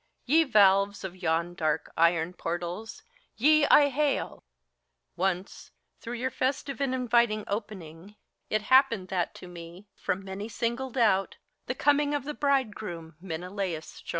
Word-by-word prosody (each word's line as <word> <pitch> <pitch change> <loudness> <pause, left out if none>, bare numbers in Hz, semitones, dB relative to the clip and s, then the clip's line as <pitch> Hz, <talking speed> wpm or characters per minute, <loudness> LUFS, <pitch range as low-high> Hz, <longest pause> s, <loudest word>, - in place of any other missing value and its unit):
Ye 320 +5 +4
valves 200 -4 +4
of 190 -1 -6
yon 170 -1 -1
dark 155 -3 -2
iron 165 +1 +2
portals, 175 +5 -5 0.3
ye 300 +5 +5
I 285 -1 +6
hail! 285 +1 -1 0.7
Once 185 +1 -2 0.3
through 235 +1 -6
your 255 +2 -2
festive 270 +2 -2
and 265 -2 0
inviting 235 -4 +2
opening 200 -3 -6 0.3
It 215 0 0
happened 230 -6 +3
that 180 -3 -2
to 180 - -10
me, 175 +3 -11
from 195 +1 -3
many 195 +3 -6
singled 235 +3 -3
out, 195 -5 +2 0.3
The - - -2
coming 290 0 +2
of 285 - -2
the 300 +2 -5
bridegroom 215 - -2
Menelaus 180 -1 -5
shone. - - -14
205 Hz, 140 wpm, -28 LUFS, 175-260 Hz, 0.7 s, I